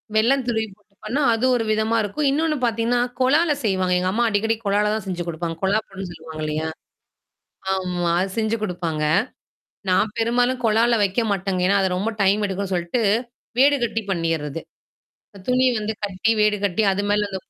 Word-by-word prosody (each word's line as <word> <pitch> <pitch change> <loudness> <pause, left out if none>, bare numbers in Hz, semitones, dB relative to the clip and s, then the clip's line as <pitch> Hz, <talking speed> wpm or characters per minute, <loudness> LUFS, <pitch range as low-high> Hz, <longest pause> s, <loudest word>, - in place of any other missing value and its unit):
வெள்ளம் 255 +5 +3
துருவி 220 -2 0
போட்டுபன்னா 215 +6 -5
அது 225 +3 0
ஒரு 235 - 0
விதமா 220 +1 +1
இருக்கும். 220 +8 -1
இன்னொன்னு 305 +1 +1
பாத்தீங்கன்னா, 230 +1 +1 0.2
கொழால 295 +6 +3
செய்வாங்க. 185 -3 +1
எங்க 185 +1 0
அம்மா 235 +4 +1
அடிக்கடிக் 225 +2 0
கொழால 205 +1 +2
தான் 220 - -2
செஞ்சு 180 -2 -3
குடுப்பாங்க. 165 0 -3
கொழா 200 +3 +3
புட்டு 195 0 -8
சொல்லுவாங்க 160 -2 -9
இல்லையா? 155 +1 -2 1.1
ஆம்மா. 180 -2 -1
அது 195 - -2
செஞ்சு 220 0 +1
குடுப்பாங்க. 170 -6 -2 0.9
நான் 210 +3 +2
பெரும்பாலும் 245 +2 +1
கொழால 225 +2 +3
வெக்க 200 +4 +1
மாட்டேங்க. 190 -1 -1
ஏன்னா, 200 +1 +3
அது 190 - +1
ரொம்ப 210 +5 -1
டைம் 200 +2 +3
எடுக்கும்ன்னு 195 0 -3
சொல்ட்டு 175 +7 -1 0.6
வீடு 285 +2 +6
கட்டி 225 -1 -1
பண்ணீர்றது. 165 -3 -2 0.9
துணி 255 +1 +3
வந்து 215 +1 -2
கட்டி, 200 +2 0
வீடு 210 0 +3
கட்டி 200 +2 +1
அது 195 +1 -1
மேல 205 0 +2
அந்த 190 - -3
210 Hz, 165 wpm, -22 LUFS, 185-230 Hz, 1.1 s, வீடு